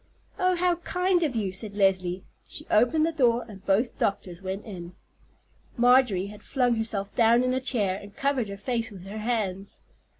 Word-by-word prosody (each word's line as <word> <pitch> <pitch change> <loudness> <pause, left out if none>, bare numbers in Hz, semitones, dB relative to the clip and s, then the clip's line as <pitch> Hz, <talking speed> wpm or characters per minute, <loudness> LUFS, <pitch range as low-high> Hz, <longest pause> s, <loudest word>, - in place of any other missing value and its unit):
"Oh, 365 0 +3
how 355 0 +1
kind 360 +1 +1
of 295 -7 0
you!" 205 -4 -1
said 200 +2 -7
Leslie. 185 -2 +1 0.2
She - - -7
opened 245 +9 +4
the 330 - 0
door, 245 -6 +2
and 195 -4 -12
both 215 +5 +1
doctors 185 -3 -2
went 190 +1 -5
in. 180 -5 -8 0.8
Marjorie 245 -6 +4
had 210 +1 -10
flung 250 -1 +1
herself 210 -3 -1
down 235 +1 +4
in 255 0 +1
a 260 - 0
chair, 205 -7 +1
and 200 0 -13
covered 275 -6 0
her 200 - -6
face 230 +2 -1
with 190 -4 -11
her 210 +2 -6
hands. 205 -4 -3
225 Hz, 180 wpm, -26 LUFS, 195-255 Hz, 0.8 s, opened